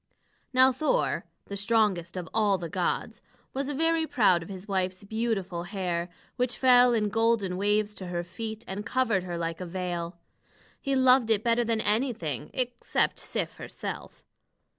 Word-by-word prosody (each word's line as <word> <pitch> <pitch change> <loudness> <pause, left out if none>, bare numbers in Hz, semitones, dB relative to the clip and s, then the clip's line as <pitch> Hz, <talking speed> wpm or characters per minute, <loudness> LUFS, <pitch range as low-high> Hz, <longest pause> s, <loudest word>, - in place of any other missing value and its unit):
Now 260 +1 +6
Thor, 310 - 0 0.2
the 200 - -6
strongest 200 -4 +1
of 175 -2 -4
all 210 -3 +3
the 170 -2 -6
gods, 180 0 -2 0.3
was 275 +1 -2
very 325 +2 +1
proud 195 - +3
of 165 - -9
his 190 +1 -8
wife's 185 -1 -1
beautiful 200 -5 -2
hair, 175 -3 -2 0.3
which 250 -1 0
fell 250 -2 +6
in 210 -2 +1
golden 225 -3 +1
waves 205 +2 +1
to 185 - -5
her 175 -1 -2
feet, 220 +5 -6
and 195 +2 -4
covered 225 -3 +1
her 175 -1 -4
like 165 +1 -3
a - - -3
veil. 175 -1 -4 0.6
He 275 -1 0
loved 260 -2 +5
it 220 -1 +2
better 235 0 +3
than 225 -1 0
anything, 205 - 0
except 245 -1 0
Sif - - -3
herself. - - -7
210 Hz, 160 wpm, -28 LUFS, 180-240 Hz, 0.6 s, Now